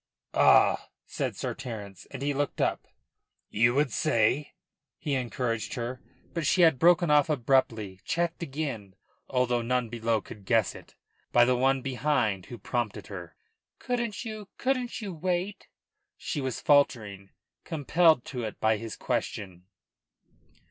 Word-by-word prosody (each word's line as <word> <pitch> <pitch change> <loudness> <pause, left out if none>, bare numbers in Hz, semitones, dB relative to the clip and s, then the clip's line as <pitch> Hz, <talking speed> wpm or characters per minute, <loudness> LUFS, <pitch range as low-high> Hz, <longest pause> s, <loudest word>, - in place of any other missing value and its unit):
"Ah?" - - +5 0.2
said - - -3
Sir - - -3
Terence, 105 -6 -8
and 135 0 -6
he 145 0 +1
looked 145 0 -2
up. - - 0 0.6
"You 120 +3 +3
would 145 -2 +2
say 115 +8 +1 0.2
?" - - -63
he 150 -4 -3
encouraged 120 -2 -2
her, 125 +1 -4 0.3
for 170 - -1
she 175 +4 +3
had 160 -6 +5
broken 175 0 +5
off 150 0 +5
abruptly, 115 -8 +1
checked 170 0 -1
again 135 - -4 0.3
although 125 -2 +1
none 125 0 0
below 115 -1 0
could 105 0 -12
guess 115 -2 +2
it - - -14 0.4
by 120 0 +6
the 125 +1 +3
one 135 +1 +2
behind 125 -7 0
who 120 - -8
prompted 120 0 -3
her. 85 -4 -8 0.4
"Couldn't 235 -3 -3
you 215 -3 -7
couldn't 255 -3 -1
you 200 -3 -5
wait?" 180 +4 -2 0.5
she 150 - -3
was 130 -2 -3
faltering, 110 -9 +2 0.3
compelled 160 -2 +3
to 125 -3 -5
it 110 - -5
by 110 0 +3
his 115 0 -6
question. 90 -2 -3
125 Hz, 145 wpm, -28 LUFS, 110-155 Hz, 0.6 s, by